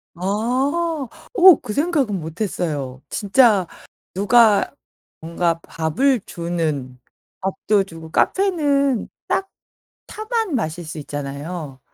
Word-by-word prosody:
아. 260 - -1 0.3
어 370 -4 +9
그 215 -4 -5
생각은 285 - 0
못했어요. 155 -6 -4
진짜 205 -3 +3 0.5
누가 210 +3 +4 0.5
뭔가 170 0 -1
밥을 205 - 0
주는. 155 -7 -3 0.4
밥도 195 +1 +1
주고 165 -4 -11
카페는 285 - +1 0.2
딱 390 0 0 0.6
차만 435 - -2
마실 170 -5 -3
수 155 0 -7
있잖아요. 145 0 -6
195 Hz, 185 characters per minute, -21 LUFS, -, 0.6 s, 어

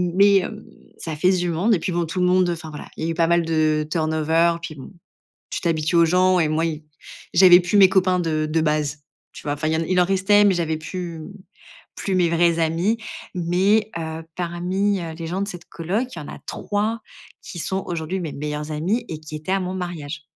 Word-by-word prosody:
mais 200 -1 +5
heu, 215 -1 -8 0.3
ça 160 -2 -5
fait 180 +5 +3
du 180 -1 0
monde 190 +7 +2
et - - -2
puis 180 - -3
bon, 170 0 0
tout 170 +3 -4
le - - +3
monde 180 -1 +3
enfin, 165 -2 -4
voilà, 150 - -9
il - - -4
y - - -1
a - - -1
eu - - -1
pas 165 0 +2
mal 170 -1 +2
de 155 -1 +1
turn 160 -1 0
over. 165 +2 +2
Puis 170 -2 -7
bon, 135 - -11 0.6
tu - - -3
t'habitues 160 -1 0
aux 170 - +6
gens 185 +2 +3
et 160 - +2
moi, 155 +2 0
ils 155 -2 -4 0.5
j'avais 180 0 +8
plus 180 +3 +1
mes 190 -2 +8
copains 185 -1 +2
de 155 -3 -1
de 160 +1 +1
base, 150 -2 0 0.3
tu - - -11
vois? 145 - -1
Enfin 155 +2 -3
il 160 - +1
y 160 - +1
en - - 0
a - - -2
il 185 +1 +1
en - - +4
restait, 195 +2 +4
mais 195 - +4
j'avais 160 -2 -1
plus, 170 +1 -6
mmh, 160 +6 -9 0.6
plus 195 - -2
mes 175 -2 +3
vrais 170 0 +2
amis. 165 +7 +1 0.4
Mais 190 +5 +2
heu, 160 0 -5
parmi, 180 +3 -1
heu, 165 -1 -5
les 165 -1 -5
gens 185 +3 -2
de 200 - -2
cette 180 -3 -8
coloc, 195 +10 -2
il - - -6
y - - -6
en 145 - -9
a - - -9
3 215 +3 -2 0.4
qui 175 - -8
sont 190 +4 -2
aujourd'hui 170 +2 -3
mes 165 -5 -5
meilleurs 150 +1 -4
amis 190 +11 -1
et 160 - -5
qui 155 0 -9
étaient 155 +4 -5
à 195 - +2
mon 185 0 -3
mariage. 165 -4 -5
170 Hz, 245 wpm, -22 LUFS, 160-185 Hz, 0.6 s, j'avais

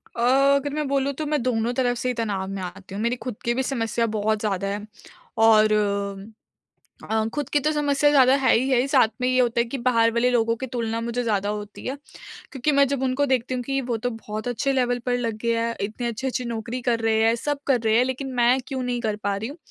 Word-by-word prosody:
अ, 235 - -3 0.3
अगर 285 +1 -1
मैं 300 -2 -2
बोलूँ 275 0 0
तो 310 +3 -4
मैं 295 -3 0
दोनों 240 -1 0
तरफ 245 -1 0
से 250 +1 -2
ही - - 0
तनाव 205 -5 -2
में 195 -1 -5
आती 190 +2 -8
हूँ, 210 - -3
मेरी 235 +1 +1
खुद 245 -1 -6
की 235 - +2
भी 260 +2 -1
समस्या 235 -3 -1
बहुत 215 +1 0
ज़्यादा 200 -2 -1
है 205 +1 -4 0.6
और 215 -1 +5 1.3
अ, 220 0 0
खुद 290 -3 -2
की 290 - +2
तो 310 - +3
समस्या 290 -1 +2
ज़्यादा 265 -2 +6
है 260 - +4
ही 255 +4 +1
है, 255 0 +3
साथ 265 -5 +4
में 250 - +1
ये 255 0 +2
होता 240 -1 +2
है - - +4
कि 270 +4 -5
बाहर 230 -2 +2
वाले 240 +1 +2
लोगों 230 -1 +2
की 260 +2 -6
तुलना 230 -1 -2
मुझे 235 +1 -2
ज़्यादा 205 -3 0
होती 210 0 -6
है, 265 - -2 0.6
क्योंकि 280 +2 0
मैं 280 0 +5
जब 275 -2 -2
उनको 265 +2 +1
देखती 255 -1 0
हूँ 250 - -2
कि 270 +2 -1
वो 240 -2 -2
तो 245 +3 -2
बहुत 215 0 -6
अच्छे 245 +3 0
लेवल 245 -2 +1
पर 245 0 +1
लग 230 -3 -2
गए 235 0 +1
हैं, 230 0 -1
इतनी 215 +4 -3
अच्छी-अच्छी 250 +2 -3
नौकरी 235 +2 -4
कर 230 -1 +2
रहे 220 0 +2
हैं, 225 +1 +4
सब 290 +3 -2
कर 255 -4 +3
रहे 220 -1 +2
हैं 250 - +4
लेकिन 260 +1 -4
मैं 245 +2 +4
क्यों 265 -2 -3
नहीं 245 -1 -2
कर 215 -3 -1
पा 200 -1 0
रही 220 +4 -4
हूँ? 290 - -9
240 Hz, 245 wpm, -24 LUFS, 225-260 Hz, 1.3 s, ज़्यादा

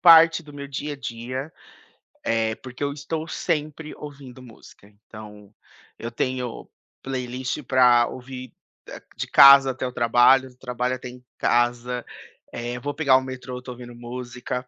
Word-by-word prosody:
parte 165 -1 +7
do 145 - -13
meu 140 -1 -8
dia 145 +2 -4
a - - -6
dia, 130 +4 -6 0.7
é 110 -1 +1
porque 130 +2 -10
eu 140 0 0
estou 155 +3 -5
sempre 155 -2 -3
ouvindo 135 -4 -11
música, 110 -4 -16 0.2
então 105 -1 -12 0.4
eu 115 - -5
tenho 125 0 -3 0.3
playlist 130 +1 -4
pra 125 -2 +4
ouvir 130 0 -8
de - - -44 0.6
de - - -3
casa 140 0 +9
até 130 0 -4
o 125 - -5
trabalho, 125 +2 +4
trabalho 125 0 -2
até 125 - -8
em 125 0 -12 0.2
casa, 120 0 +1 0.5
eh, 120 +1 -4
vou 145 +2 -3
pegar 140 -3 +3
o 130 - +4
metrô, 130 -1 -7
tô 125 - -8
ouvindo 120 -1 -10
música. 125 +1 -6
125 Hz, 150 wpm, -24 LUFS, 120-140 Hz, 0.7 s, casa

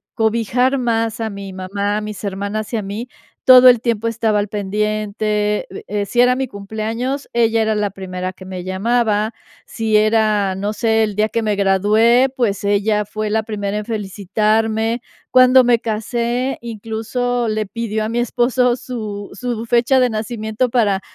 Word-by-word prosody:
cobijar 235 +4 +1
más 230 -1 -1
a 220 - -1
mi 200 -2 -8
mamá, 200 +2 -2
a - - -2
mis 210 -1 -7
hermanas 200 +3 -4
y - - +1
a - - -1
mí, 205 +5 -5 0.4
todo 255 0 +9
el 245 -3 +6
tiempo 230 -2 -1
estaba 225 -2 +1
al 205 - -1
pendiente, 210 +1 -1
uh, - - -12
eh, 205 0 -2
si 240 +4 +2
era 250 0 +5
mi 265 0 -1
cumpleaños, 225 +6 -4
ella 230 -1 +2
era 220 0 +1
la 210 -1 0
primera 185 -1 -5
que 185 - -13
me 185 -1 -6
llamaba, 215 +3 0 0.3
si 220 -2 0
era, 215 -2 +2
no 200 +2 -2
sé, 220 +1 +1
el 210 -2 -2
día 215 0 +3
que 230 - -1
me 215 -2 0
gradué, 215 +6 +3
pues, 210 -6 0
ella 205 +1 +1
fue 215 +1 -4
la 220 +1 0
primera 210 -2 -3
en 210 - -3
felicitarme. 220 +2 0 0.3
Cuando 255 0 +6
me 240 -1 +4
casé, 235 +3 -2
incluso 230 +2 -2
le 215 0 -1
pidió 220 0 -3
a - - -3
mi 235 +1 -1
esposo 245 +1 +1
su 215 -6 -6
su 235 +2 -4
fecha 240 +3 +3
de 250 -1 +3
nacimiento 220 +1 -2
para 210 -5 +1
220 Hz, 175 wpm, -18 LUFS, 205-235 Hz, 0.4 s, todo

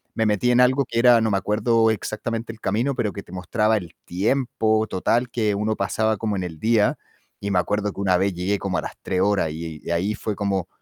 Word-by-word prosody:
me 110 - +1
metí 105 +3 +1
en 125 0 +4
algo 130 +2 +4
que 115 -1 -5
era, 120 -1 +6
no 110 - +1
me 100 - +2
acuerdo 110 +3 +2
exactamente 115 +2 -4
el 110 - -14
camino, 120 +8 0
pero 110 -4 -1
que 100 - -6
te - - -17
mostraba 105 +4 +1
el 90 -3 -7
tiempo 110 +2 0
total 120 +6 0
que 110 -4 0
uno 105 +2 -1
pasaba 110 +2 0
como 105 -2 -2
en 95 - -2
el 80 -3 -7
día, 110 -2 +2 0.4
y 100 0 -3
me 90 - +3
acuerdo 105 +2 -1
que - - -10
una 95 -2 +3
vez 95 0 +1
llegué 95 +4 -1
como 95 -2 -2
a - - -3
las - - -6
3 90 - -1
horas 95 -6 +1
y 80 -1 -7
y - - -4
ahí 95 +5 0
fue 105 -2 -4
como 100 -3 -1
105 Hz, 240 wpm, -23 LUFS, 95-115 Hz, 0.4 s, era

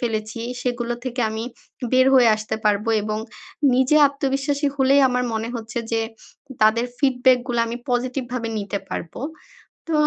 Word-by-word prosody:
ফেলেছি 220 -1 -3 0.2
সেগুলো 240 -1 -2
থেকে 250 -1 -3
আমি 220 +1 -4 0.5
বের 255 0 +5
হয়ে 250 -3 +6
আসতে 215 0 -4
পারবো 210 +1 +2
এবং 215 0 -2 0.6
নিজে 260 +4 +3
আত্মবিশ্বাসী 280 +1 -1
হলেই 275 +1 +4
আমার 250 0 0
মনে 220 +1 -2
হচ্ছে 225 0 -5
যে 225 - +2 0.6
তাদের 230 +3 +4
ফিডব্যাক 255 -2 +4
গুলো 240 -2 -1
আমি 230 +1 -4
পজিটিভ 250 +1 -1
ভাবে 235 -2 -2
নিতে 200 0 -3
পারবো। 165 - -6 0.7
তো 330 - -2
245 Hz, 150 wpm, -22 LUFS, 220-260 Hz, 0.7 s, হয়ে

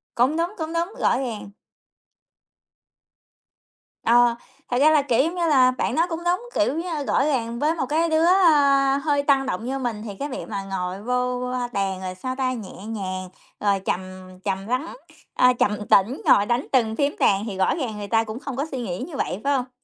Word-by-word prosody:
Cũng 260 +7 +2
đúng, 345 +4 -1
cũng 320 0 -4
đúng, 340 +5 -1
rõ - - +2
ràng. 230 -6 -5 2.5
Ờ, 240 0 +4 0.4
thật 245 - +1
ra 310 +2 +6
là, 300 -2 +5
kiểu 265 -1 +2
giống 335 +3 -2
như 345 -1 0
là, 260 -4 +5
bạn 255 - -2
nói 335 +2 +2
cũng 330 0 -3
đúng, 365 +8 -1
kiểu 310 -3 +2
như, 330 -4 -3
rõ - - +2
ràng 235 -5 -1
với 310 +3 +1
một 265 - -1
cái 325 +2 +1
đứa, 315 +1 +3
ơ, 285 -7 +4
hơi 285 -1 0
tăng 275 -2 +3
động 225 -2 -3
như 270 +1 -2
mình 230 -4 -3
thì 200 -2 -6
cái 285 +1 -3
việc 255 - -5
mà 200 -2 -4
ngồi 190 0 -4
vô, 250 0 -1
ơ, 250 -1 -2
bàn 195 -1 -1
rồi, 185 0 -5
sao 255 +7 -4
ta, 260 -1 0
nhẹ 210 -3 -8
nhàng, 185 -4 -5 0.3
rồi 200 -1 +1
trầm 180 - 0 0.4
trầm 195 0 -3
lắng, 255 - -2 0.4
ờ, 250 0 +4
trầm 210 0 0
tĩnh 215 +8 +3
ngồi 205 - +5
đánh 240 +3 0
từng 225 -4 +2
phím 285 +2 0
đàn 200 +2 +3
thì 195 -4 -5
rõ 190 - +2
ràng 245 -9 -4
người 205 -1 -6
ta 225 +1 +2
cũng 220 +2 -7
không 275 -3 -6
có 280 +3 -1
suy 265 - -3
nghĩ 180 -6 -4
như 315 - -9
vậy, 200 -4 -2
phải 285 - +2
hông? 250 -1 -2
255 Hz, 215 wpm, -23 LUFS, 210-290 Hz, 2.5 s, ra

